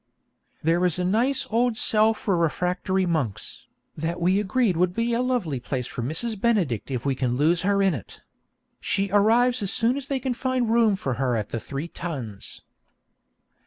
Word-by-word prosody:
There 165 Hz, +3 st, +2 dB
is 180 Hz, -2 st, +1 dB
a 180 Hz, -, -1 dB
nice 255 Hz, +8 st, +2 dB
old 235 Hz, 0 st, +2 dB
cell 220 Hz, -1 st, +3 dB
for 200 Hz, -3 st, -1 dB
refractory 180 Hz, +3 st, 0 dB
monks, 155 Hz, -, -3 dB, 0.3 s
that 165 Hz, +3 st, -3 dB
we 185 Hz, +3 st, +2 dB
agreed 210 Hz, 0 st, +1 dB
will 180 Hz, +2 st, +3 dB
be 230 Hz, +6 st, -1 dB
a 235 Hz, -, +1 dB
lovely 240 Hz, -, -1 dB
place 125 Hz, 0 st, -3 dB
for 120 Hz, -, -5 dB
Mrs. 190 Hz, -, -2 dB
Benedict 180 Hz, -, +1 dB
if 125 Hz, -2 st, -3 dB
we 140 Hz, -, +2 dB
can 125 Hz, -2 st, -1 dB
lose 165 Hz, +4 st, +2 dB
her 200 Hz, +1 st, +2 dB
in 190 Hz, -2 st, +3 dB
it. 120 Hz, -, -8 dB, 0.6 s
She 195 Hz, -1 st, -1 dB
arrives 235 Hz, +4 st, +3 dB
as 195 Hz, -, -1 dB
soon 240 Hz, +3 st, +1 dB
as 280 Hz, -1 st, -4 dB
they 275 Hz, -2 st, -1 dB
can 255 Hz, 0 st, -2 dB
find 255 Hz, -2 st, -1 dB
room 225 Hz, -3 st, +4 dB
for 135 Hz, -9 st, -3 dB
her 125 Hz, -2 st, +1 dB
at 105 Hz, -2 st, -3 dB
the 115 Hz, -, -3 dB
Three 140 Hz, +7 st, -5 dB
Tuns. 135 Hz, -, -6 dB
185 Hz, 185 wpm, -25 LUFS, 150-230 Hz, 0.6 s, room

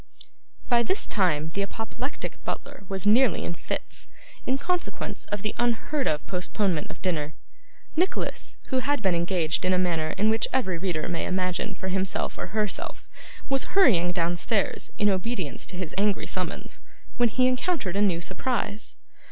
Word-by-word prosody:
By 240 Hz, -1 st, +5 dB
this 380 Hz, -, +2 dB
time, 160 Hz, -6 st, +2 dB
the 200 Hz, +5 st, -2 dB
apoplectic 225 Hz, +7 st, -4 dB
butler -, -, -5 dB
was 195 Hz, 0 st, -2 dB
nearly 225 Hz, -1 st, +5 dB
in -, -, -2 dB
fits, -, -, -4 dB, 0.4 s
in 260 Hz, -, +3 dB
consequence 360 Hz, +5 st, -2 dB
of 205 Hz, -1 st, -3 dB
the 210 Hz, -, 0 dB
unheard 240 Hz, +4 st, +1 dB
of 150 Hz, -1 st, 0 dB
postponement 180 Hz, -2 st, 0 dB
of -, -, -10 dB
dinner. 155 Hz, -5 st, -1 dB, 0.6 s
Nicholas, 360 Hz, +4 st, 0 dB
who 260 Hz, -, +2 dB
had 285 Hz, -2 st, 0 dB
been 190 Hz, -2 st, +4 dB
engaged 170 Hz, -1 st, +1 dB
in 185 Hz, 0 st, +3 dB
a -, -, +4 dB
manner 165 Hz, -4 st, +1 dB
in 215 Hz, +2 st, +4 dB
which 225 Hz, -, +2 dB
every 190 Hz, -10 st, +1 dB
reader 170 Hz, -4 st, -1 dB
may 170 Hz, -, -1 dB
imagine 185 Hz, -1 st, 0 dB
for 190 Hz, -, -4 dB
himself 190 Hz, 0 st, -1 dB
or -, -, -3 dB
herself, 210 Hz, +2 st, -2 dB, 0.4 s
was 270 Hz, +7 st, 0 dB
hurrying 180 Hz, -, +6 dB
downstairs 175 Hz, +5 st, 0 dB
in 210 Hz, -, +4 dB
obedience 190 Hz, -4 st, -1 dB
to 180 Hz, -, -5 dB
his 180 Hz, -4 st, -3 dB
angry 205 Hz, 0 st, +2 dB
summons, -, -, -4 dB, 0.4 s
when 240 Hz, -1 st, +4 dB
he 255 Hz, +4 st, +3 dB
encountered 255 Hz, -, +1 dB
a 200 Hz, -, +2 dB
new 180 Hz, -5 st, +3 dB
surprise. 220 Hz, +1 st, -2 dB
195 Hz, 160 wpm, -27 LUFS, 175-240 Hz, 0.6 s, hurrying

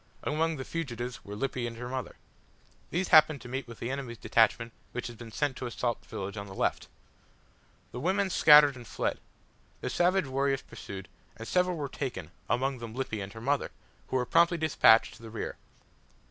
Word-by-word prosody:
Among 160 Hz, +2 st, 0 dB
the 130 Hz, -, -5 dB
fugitives 125 Hz, -7 st, -4 dB
were 100 Hz, -, -7 dB
Lippy 125 Hz, +1 st, -2 dB
and 115 Hz, -1 st, -7 dB
her 125 Hz, +1 st, -5 dB
mother. 130 Hz, 0 st, -4 dB, 0.7 s
These 180 Hz, +3 st, -1 dB
happened 155 Hz, -3 st, +7 dB
to 125 Hz, -, -10 dB
meet 130 Hz, +2 st, -4 dB
with 115 Hz, -1 st, -10 dB
the 120 Hz, -, -4 dB
enemy's 135 Hz, -4 st, -5 dB
detachment 115 Hz, +1 st, +2 dB, 0.2 s
which 125 Hz, -, -4 dB
had 120 Hz, -, -6 dB
been 115 Hz, 0 st, -10 dB
sent 145 Hz, +2 st, -1 dB
to 125 Hz, -, -4 dB
assault 120 Hz, 0 st, -2 dB
the -, -, -24 dB
village 100 Hz, +2 st, -5 dB
on 100 Hz, 0 st, -5 dB
the 95 Hz, -, -10 dB
left. -, -, -1 dB, 1.0 s
The 125 Hz, -, -6 dB
women 190 Hz, +6 st, +1 dB
scattered 150 Hz, -4 st, +7 dB
and 120 Hz, -2 st, -11 dB
fled. -, -, -2 dB, 0.6 s
The -, -, -3 dB
savage 180 Hz, 0 st, +2 dB
warriors 135 Hz, 0 st, 0 dB
pursued, 95 Hz, -2 st, -9 dB, 0.3 s
and 115 Hz, -, -8 dB
several 180 Hz, -1 st, +1 dB
were 145 Hz, -2 st, -3 dB
taken, 120 Hz, -, -5 dB, 0.2 s
among 130 Hz, +1 st, 0 dB
them 115 Hz, -1 st, -7 dB
Lippy 130 Hz, -5 st, -3 dB
and 95 Hz, 0 st, -6 dB
her 110 Hz, -, -9 dB
mother, 140 Hz, +4 st, 0 dB, 0.4 s
who -, -, -4 dB
were 125 Hz, -1 st, +2 dB
promptly 170 Hz, +6 st, +4 dB
despatched 150 Hz, -8 st, +5 dB
to -, -, -19 dB
the 115 Hz, -, -9 dB
rear. 110 Hz, -, -5 dB
130 Hz, 195 wpm, -29 LUFS, 115-150 Hz, 1.0 s, happened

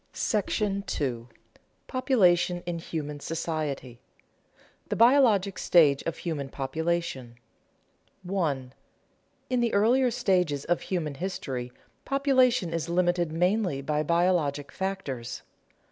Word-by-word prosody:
§ 205 Hz, -2 st, -1 dB
II. 120 Hz, -4 st, -2 dB, 0.6 s
POPULATION 180 Hz, -9 st, +2 dB
IN 175 Hz, -1 st, -3 dB
HUMAN 150 Hz, -3 st, -5 dB
SOCIETY 150 Hz, -6 st, -4 dB
[Sidenote: -, -, -35 dB
The -, -, -1 dB
biologic 230 Hz, -6 st, +4 dB
stage 150 Hz, -6 st, +4 dB
of 165 Hz, -, -3 dB
human 150 Hz, -5 st, -4 dB
population] 140 Hz, -3 st, -3 dB, 0.9 s
1. 150 Hz, -9 st, -2 dB, 0.8 s
_In 250 Hz, -1 st, +2 dB
the 235 Hz, -1 st, +1 dB
earlier 245 Hz, +5 st, +4 dB
stages 180 Hz, -, 0 dB
of 175 Hz, -, 0 dB
human 165 Hz, -6 st, -2 dB
history, 135 Hz, -7 st, -4 dB, 0.3 s
population 255 Hz, -, +2 dB
is 165 Hz, 0 st, -2 dB
limited 175 Hz, -1 st, +1 dB
mainly 180 Hz, -3 st, 0 dB
by 150 Hz, +1 st, 0 dB
biologic 165 Hz, -3 st, +1 dB
factors. 190 Hz, -11 st, -4 dB
170 Hz, 105 wpm, -27 LUFS, 145-195 Hz, 0.9 s, biologic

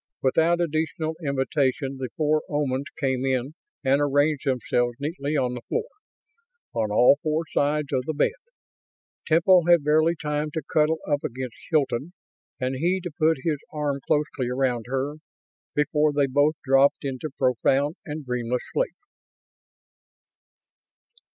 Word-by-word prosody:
Without 165 Hz, +6 st, +3 dB
additional 160 Hz, -1 st, -1 dB
invitation 135 Hz, -1 st, 0 dB
the 130 Hz, -2 st, -4 dB
four 155 Hz, 0 st, +2 dB
Omans 140 Hz, -2 st, -1 dB
came 130 Hz, -3 st, 0 dB
in 130 Hz, +1 st, -1 dB, 0.3 s
and 135 Hz, +1 st, +3 dB
arranged 145 Hz, +1 st, +1 dB
themselves 120 Hz, -2 st, 0 dB
neatly 150 Hz, 0 st, -2 dB
on 125 Hz, -2 st, 0 dB
the 125 Hz, -, -6 dB
floor, 460 Hz, -, -2 dB, 0.9 s
on 110 Hz, -2 st, 0 dB
all 125 Hz, +7 st, +5 dB
four 155 Hz, +1 st, 0 dB
sides 145 Hz, 0 st, +1 dB
of 130 Hz, -1 st, 0 dB
the 155 Hz, -, -1 dB
bed. 150 Hz, -, +2 dB, 0.9 s
Temple 170 Hz, +2 st, +5 dB
had 170 Hz, -3 st, +5 dB
barely 155 Hz, +3 st, +3 dB
time 150 Hz, 0 st, -2 dB
to 160 Hz, -, -2 dB
cuddle 155 Hz, +1 st, +3 dB
up 145 Hz, -1 st, 0 dB
against 125 Hz, -1 st, -4 dB, 0.2 s
Hilton, 145 Hz, 0 st, 0 dB, 0.5 s
and 130 Hz, 0 st, -1 dB
he 175 Hz, +6 st, +1 dB
to 175 Hz, -2 st, -6 dB
put 155 Hz, -3 st, +1 dB
his 155 Hz, -4 st, 0 dB
arm 145 Hz, -2 st, -2 dB
closely 145 Hz, -4 st, 0 dB
around 125 Hz, -2 st, 0 dB
her, 135 Hz, +3 st, -2 dB, 0.6 s
before 150 Hz, +1 st, +2 dB
they 145 Hz, -1 st, +2 dB
both 145 Hz, +3 st, +2 dB
dropped 135 Hz, +1 st, +3 dB
into 135 Hz, +3 st, -3 dB
profound 135 Hz, +4 st, +2 dB
and 150 Hz, -1 st, -6 dB
dreamless 125 Hz, 0 st, -2 dB
sleep. -, -, 0 dB
145 Hz, 140 wpm, -25 LUFS, 130-155 Hz, 0.9 s, all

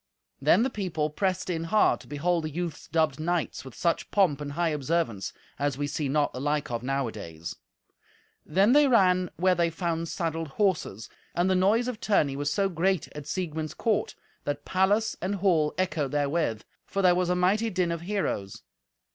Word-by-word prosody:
Then 165 Hz, +10 st, +5 dB
the 260 Hz, -, 0 dB
people 165 Hz, -8 st, -2 dB
pressed 185 Hz, +3 st, -1 dB
in 165 Hz, -2 st, -2 dB
hard 210 Hz, +6 st, +3 dB
to -, -, -15 dB
behold 165 Hz, +3 st, 0 dB
the -, -, -2 dB
youths 170 Hz, +1 st, -5 dB
dubbed 160 Hz, -4 st, +1 dB
knights 170 Hz, 0 st, -1 dB
with 130 Hz, -2 st, -11 dB
such 170 Hz, -2 st, 0 dB
pomp 175 Hz, -8 st, +2 dB
and 145 Hz, -1 st, -5 dB
high 170 Hz, +2 st, +1 dB
observance 150 Hz, -, -1 dB, 0.3 s
as 140 Hz, -2 st, 0 dB
we 145 Hz, -, -1 dB
see 145 Hz, 0 st, -2 dB
not 145 Hz, +1 st, +1 dB
the 130 Hz, -, -5 dB
like 145 Hz, -1 st, -1 dB
of 120 Hz, -1 st, -2 dB
nowadays. 115 Hz, -12 st, -4 dB, 0.9 s
Then 195 Hz, +8 st, +3 dB
they 295 Hz, 0 st, +6 dB
ran 185 Hz, -7 st, +4 dB
where 185 Hz, +1 st, +3 dB
they 170 Hz, -1 st, +2 dB
found 165 Hz, -1 st, -2 dB
saddled 165 Hz, -1 st, -2 dB
horses. 155 Hz, -, -1 dB, 0.3 s
And 175 Hz, +2 st, +2 dB
the -, -, +3 dB
noise 210 Hz, +6 st, +3 dB
of 245 Hz, -4 st, -4 dB
tourney 150 Hz, -10 st, +2 dB
was 145 Hz, +1 st, -1 dB
so 195 Hz, +5 st, +2 dB
great 185 Hz, -1 st, 0 dB
at 150 Hz, -1 st, -7 dB
Siegmund's 160 Hz, -3 st, -3 dB
court 220 Hz, -3 st, 0 dB, 0.3 s
that 145 Hz, 0 st, -3 dB
palace 205 Hz, +4 st, +2 dB
and 190 Hz, +3 st, -1 dB
hall 175 Hz, -6 st, +2 dB
echoed 160 Hz, -7 st, -1 dB
therewith, 145 Hz, -6 st, 0 dB, 0.2 s
for 195 Hz, -, -1 dB
there 180 Hz, -1 st, +6 dB
was 180 Hz, 0 st, +1 dB
a 180 Hz, -, +2 dB
mighty 200 Hz, +6 st, +2 dB
din 180 Hz, -4 st, 0 dB
of 170 Hz, -1 st, -3 dB
heroes. 170 Hz, -, -3 dB
170 Hz, 185 wpm, -27 LUFS, 145-185 Hz, 0.9 s, they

